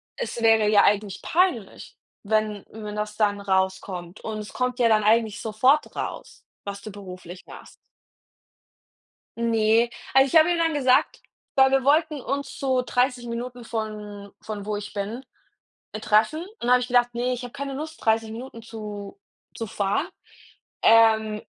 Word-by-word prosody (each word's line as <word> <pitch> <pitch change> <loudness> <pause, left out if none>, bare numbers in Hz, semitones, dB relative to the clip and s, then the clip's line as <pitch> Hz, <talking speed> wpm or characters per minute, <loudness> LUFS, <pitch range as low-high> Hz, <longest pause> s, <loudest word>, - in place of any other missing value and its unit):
es 480 - -5
wäre 225 -2 +4
ja 205 -1 +5
eigentlich 205 -1 +1
peinlich, 325 - -1 0.3
wenn 215 -1 0
wenn 210 -1 -7
das 210 0 -4
dann 205 -2 +1
rauskommt. 190 -1 -2
Und 220 -1 -5
es 210 - -8
kommt 250 0 -2
ja 240 - +4
dann 215 -1 +3
eigentlich 220 0 +2
sofort 255 +7 +2
raus, - - -6 0.2
was 200 0 -6
du 215 - -8
beruflich 185 -3 -10
machst. - - -13 1.6
Ne, 230 0 +3 0.3
also, 270 0 +6
ich 300 - -1
habe 320 +2 +7
ihm 345 - +1
dann 330 -1 +1
gesagt 260 -3 +2 0.4
weil 265 0 +6
wir 270 -1 +2
wollten 305 +1 +2
uns 280 +1 -4
so 260 -2 +1
30 250 0 0
Minuten 240 +1 -6
von 210 -3 -6
von 210 -2 -6
wo 210 0 -2
ich 205 0 -7
bin, 210 +5 -4 0.7
äh, 215 - -4
treffen 220 +11 +2
und 360 - -9
dann 245 - +1
habe 250 - +6
ich 250 - -3
gedacht: 245 -1 +2
„Ne, 245 +1 -1
ich 250 0 -6
habe 245 - -8
keine 280 0 -5
Lust, 310 +3 -7
30 220 0 +1
Minuten 230 +1 -8
zu 210 -3 -8 0.4
zu 225 - -5
fahren, 200 0 -1 0.8
ähm, 220 -1 +5
225 Hz, 165 wpm, -24 LUFS, 210-250 Hz, 1.6 s, habe